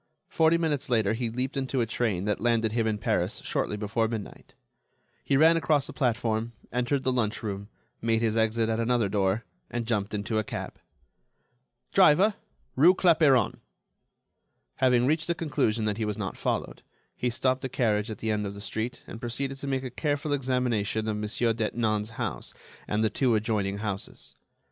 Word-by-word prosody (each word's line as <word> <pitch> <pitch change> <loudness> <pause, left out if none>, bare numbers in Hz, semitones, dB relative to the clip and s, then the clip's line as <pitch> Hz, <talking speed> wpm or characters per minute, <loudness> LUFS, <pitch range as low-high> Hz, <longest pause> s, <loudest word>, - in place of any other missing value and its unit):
Forty 160 +1 +4
minutes 155 -6 -1
later 110 -4 +2
he 115 0 -2
leaped 125 +3 -3
into 135 -1 -1
a 120 - +2
train 105 -5 -1
that 105 -2 -1
landed 115 -2 +2
him 115 0 0
in 110 -1 0
Paris 100 - 0
shortly 105 - -1
before 110 +2 0
midnight. 110 -2 -7 0.7
He 135 - +2
ran 165 +3 +6
across 150 -3 +2
the - - -8
platform, 115 -3 0 0.2
entered 125 +3 0
the 130 - +1
lunch 115 -4 -1
room, 100 -1 -4 0.3
made 115 0 +1
his 110 -1 +1
exit 110 0 +2
at 110 0 0
another 115 -2 +2
door, 100 +2 0 0.2
and 120 -1 -3
jumped 105 -2 -1
into 105 +2 -1
a - - 0
cab. - - -6 1.1
"Driver—rue 180 -3 +4
Clapeyron." 155 - +4 1.2
Having 125 -2 +4
reached 155 +4 +1
the 170 - 0
conclusion 115 -9 0
that 105 -1 -1
he 110 - -1
was 105 -1 -2
not 95 -3 -4
followed, - - -2 0.3
he 125 - -1
stopped 130 +2 0
the 130 - -3
carriage 110 -4 +1
at 110 - -5
the 110 +1 -2
end 105 -1 -1
of 100 - -6
the - - -8
street, 110 +4 -4
and 115 - -9
proceeded 135 +3 -3
to 140 - -5
make 135 -1 -1
a 130 - -5
careful 145 +2 -1
examination 125 -5 0
of 105 -1 -1
Monsieur 115 +2 0
Detinan's 110 -1 -1
house - - -4 0.3
and 105 +1 0
the 110 - +2
two 125 +1 +2
adjoining 105 -2 0
houses. 105 -2 -5
115 Hz, 175 wpm, -27 LUFS, 110-130 Hz, 1.2 s, ran